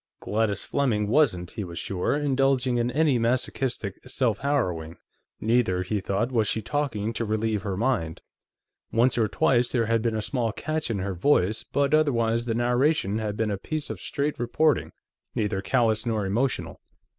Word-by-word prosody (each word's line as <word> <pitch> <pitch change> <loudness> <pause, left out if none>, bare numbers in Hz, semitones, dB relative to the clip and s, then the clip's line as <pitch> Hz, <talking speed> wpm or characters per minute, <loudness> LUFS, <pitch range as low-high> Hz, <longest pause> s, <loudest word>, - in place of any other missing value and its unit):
Gladys 105 -2 -1
Fleming 115 -7 0
wasn't, 105 - +2
he 110 - -4
was 85 -2 -8
sure, 95 +7 -1
indulging 135 -3 +2
in 120 +1 +1
any 145 -1 +2
masochistic 120 -3 -1
self 125 -4 0
harrowing; 90 - -1 0.4
neither, 110 -5 +2
he 100 +2 -2
thought, 100 +6 -1
was 115 -4 +2
she 110 - 0
talking 115 -4 -2
to 115 - -2
relieve 110 -1 -1
her 100 -3 -3
mind. 105 -9 0 0.7
Once 120 +3 +3
or 115 -2 +2
twice 120 +3 +2
there 120 -3 +1
had 115 0 +1
been 115 -1 0
a - - -1
small 120 -3 -1
catch 155 +5 -3
in 110 - -1
her 95 0 -2
voice, 105 +1 +2
but 140 0 0
otherwise 120 -7 +2
the 115 -2 -1
narration 120 -2 +1
had 105 -1 -3
been 110 -1 0
a 100 - -2
piece 155 +6 -4
of - - -7
straight 145 -1 -2
reporting, 145 +5 +1 0.4
neither 105 -3 -1
callous 110 -1 +1
nor 110 -3 -1
emotional. 115 +6 -1
115 Hz, 170 wpm, -26 LUFS, 105-130 Hz, 0.7 s, Once